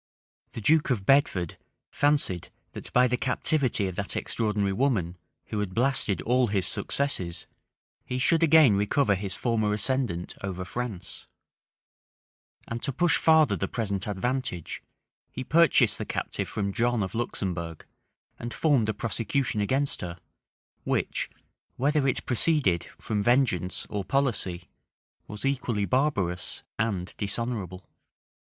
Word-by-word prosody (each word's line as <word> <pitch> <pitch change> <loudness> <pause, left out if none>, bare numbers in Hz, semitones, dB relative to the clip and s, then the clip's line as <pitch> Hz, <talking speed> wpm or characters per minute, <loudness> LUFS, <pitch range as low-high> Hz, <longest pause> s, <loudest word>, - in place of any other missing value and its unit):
The 115 - -6
duke 155 +8 +3
of 110 -7 0
Bedford 95 - +2 0.3
fancied 145 - +1 0.2
that, - - -9
by 125 +1 +5
the 125 0 0
captivity 130 -4 +1
of 95 - -5
that 100 - -3
extraordinary 105 -3 -1
woman, 100 -8 0 0.3
who 105 - -2
had 95 -3 -3
blasted 120 -7 +1
all 125 +1 +3
his 100 -3 0
successes, 95 -12 -2 0.6
he 125 - -4
should 160 +6 +3
again 160 -8 +6
recover 105 +3 +2
his 95 -1 -3
former 110 -3 0
ascendant 105 -6 0
over 95 -2 -4
France; 110 -3 -6 1.4
and 115 0 -4
to 140 - -1
push 170 +4 +3
farther 160 -2 +4
the - - -2
present 100 -4 -2
advantage, 105 - -2 0.5
he 130 - -5
purchased 165 +2 +4
the - - -3
captive - - -3
from 100 -2 -2
John 120 0 +1
of 95 - -5
Luxembourg, 90 -8 -3 0.5
and 120 +1 -5
formed 135 -9 +2
a 110 - -1
prosecution 115 0 -1
against 135 +7 0
her, 85 -1 -5 0.7
which, - - -1 0.5
whether 145 +1 +1
it 130 - -1
proceeded 125 - +2
from 105 -2 -2
vengeance 105 -6 +1
or 105 -2 -3
policy, 100 -8 -1 0.6
was 105 +4 -6
equally 125 -6 0
barbarous 100 - 0 0.2
and 100 -5 -1
dishonorable. 100 -3 -3
115 Hz, 130 wpm, -27 LUFS, 95-135 Hz, 1.4 s, again